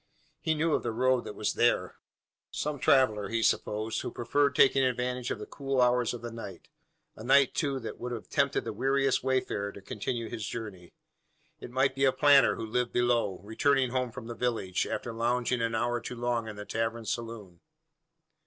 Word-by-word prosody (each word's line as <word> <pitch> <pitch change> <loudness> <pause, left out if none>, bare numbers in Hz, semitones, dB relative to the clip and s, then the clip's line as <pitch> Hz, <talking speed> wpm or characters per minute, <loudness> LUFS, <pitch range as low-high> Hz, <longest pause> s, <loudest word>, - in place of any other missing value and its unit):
He 160 - 0
knew 155 +1 +1
of - - +2
the 120 - -2
road 125 +2 +1
that - - -7
was 105 - -1
there. 120 - +1 0.5
Some 150 -1 -3
traveller, 115 -7 +3
he 115 0 0
supposed, 110 +1 0
who - - -4
preferred 140 +4 0
taking 135 0 +5
advantage 125 0 -1
of - - -2
the - - -7
cool 135 -2 -3
hours 125 -1 +3
of 120 -2 -7
the 120 - -5
night 100 -6 -9 0.5
a 110 - -10
night, 135 +2 +4
too, 140 -3 -1
that 115 - -7
would 125 - -5
have 115 -2 -6
tempted - - +1
the - - -4
weariest 135 +4 +1
wayfarer 130 -6 -1
to - - -10
continue 115 +4 -4
his 110 - -5
journey. 100 -7 -7 0.7
It - - -9
might 130 +2 +1
be 135 +1 +1
a 135 - +5
planter 140 -1 +5
who 115 - -5
lived 120 +2 -1
below, 120 -6 +1
returning 130 +4 +1
home 125 -1 -1
from 115 - -8
the 120 - -6
village, 115 -7 -1
after 120 - -4
lounging 120 +1 0
an 115 0 0
hour 120 +1 0
too 125 - -6
long 120 -1 -1
in 105 - -6
the 105 0 -8
tavern 115 +1 -2
saloon. 110 -6 -5
120 Hz, 195 wpm, -29 LUFS, 115-130 Hz, 0.7 s, taking